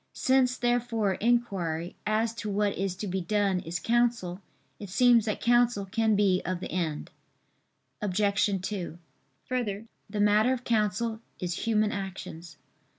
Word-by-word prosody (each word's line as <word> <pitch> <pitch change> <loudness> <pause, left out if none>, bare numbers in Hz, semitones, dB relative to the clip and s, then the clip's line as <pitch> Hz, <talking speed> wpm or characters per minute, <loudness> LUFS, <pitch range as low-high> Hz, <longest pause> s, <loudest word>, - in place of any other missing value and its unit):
Since 260 -1 +2
therefore 240 -4 +1
inquiry 190 -8 0
as 220 +1 +1
to 215 - -4
what 205 0 0
is 195 -1 -2
to 205 - -5
be 190 0 -2
done 200 0 +1
is 165 0 -4
counsel, 230 -6 0 0.4
it 205 - -8
seems 235 +2 +5
that 215 - -2
counsel 240 -4 +3
can 220 +2 +1
be 195 -3 +3
of 185 -1 -2
the - - -6
end. 165 -5 -2 0.9
Obj. 200 0 +1
2: 185 -5 -4 0.5
Further, 225 -5 -2 0.2
the 210 +1 -4
matter 210 +4 +4
of 250 -1 -4
counsel 220 0 0 0.2
is 180 +1 -3
human 215 -1 +2
actions. 180 -5 -7
210 Hz, 145 wpm, -28 LUFS, 185-230 Hz, 0.9 s, seems